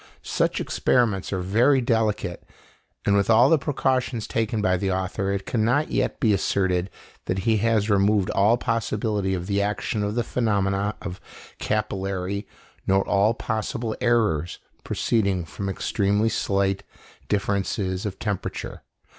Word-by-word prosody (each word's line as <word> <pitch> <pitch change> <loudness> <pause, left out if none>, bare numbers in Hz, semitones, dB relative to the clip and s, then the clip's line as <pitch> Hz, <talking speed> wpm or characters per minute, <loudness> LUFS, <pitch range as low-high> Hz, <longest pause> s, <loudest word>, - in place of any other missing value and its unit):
Such - - 0
experiments 110 -7 +1
are 95 -2 -1
very 115 +9 +3
delicate; 110 -7 0 0.6
and 100 - +3
with 100 +1 +2
all 120 +4 +6
the 160 - +5
precautions 130 -5 0
taken 110 -1 -1
by 95 -3 +2
the 95 +1 -1
author, 95 +1 -1
it 100 -1 -2
cannot 120 +7 +1
yet - - 0
be 110 -6 +3
asserted 95 -1 +1 0.4
that 95 +1 -2
he 110 -2 +3
has 110 -1 +2
removed 100 -1 +2
all 105 +4 +3
possibility 105 -4 -1
of 90 -1 -4
the 100 +1 0
action 105 +1 -1
of 105 +1 -2
the 120 - +1
phenomena 100 -3 0
of 90 -2 -6 0.4
capillarity 100 -1 -2 0.4
nor 95 0 +2
all 105 +3 +3
possible 110 0 -3
errors 105 -10 +1 0.3
proceeding 100 -6 0
from 100 +4 -5
extremely 100 +2 +1
slight 100 -2 0 0.5
differences 100 -2 -1
of 105 -3 -4
temperature. 100 -4 -4
100 Hz, 140 wpm, -24 LUFS, 95-115 Hz, 0.6 s, all